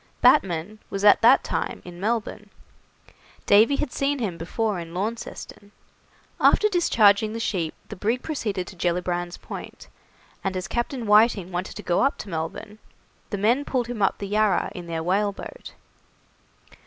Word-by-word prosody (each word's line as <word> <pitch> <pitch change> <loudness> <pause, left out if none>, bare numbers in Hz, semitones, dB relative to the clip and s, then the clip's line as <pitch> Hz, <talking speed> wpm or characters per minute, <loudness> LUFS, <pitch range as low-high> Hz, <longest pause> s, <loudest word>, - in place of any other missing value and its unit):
Batman 190 - +3
was 195 +1 -2
at 205 - +7
that 240 +4 +6
time - - -3
in 175 -1 -10
Melbourne. 210 0 -2 1.0
Davy 220 +7 +5
had 275 -2 -2
seen 280 +1 0
him 210 -9 -3
before 195 +4 -2
in 165 0 -8
Launceston. 205 0 -5 0.7
After 425 - +5
discharging 220 - +3
the 230 - -4
sheep 180 -8 -2
the 210 - -6
brig 225 +6 -1
proceeded 210 - -3
to 190 - -11
Gellibrand's 175 0 -2
Point, - - -9 0.5
and 190 -1 -2
as 185 -1 -4
Captain 240 +2 -3
Whiting 210 -3 +4
wanted 180 +1 -4
to - - -8
go 175 - +1
up 275 +2 +1
to 205 - -8
Melbourne, 165 +5 -5 0.5
the 205 - -3
men 235 +8 +2
pulled 255 -4 -1
him 235 -2 -5
up 195 - +2
the 200 - -5
Yarra 210 -2 +1
in 175 -1 -8
their 165 -1 -3
whaleboat. 200 - -2
205 Hz, 155 wpm, -24 LUFS, 180-230 Hz, 1.0 s, at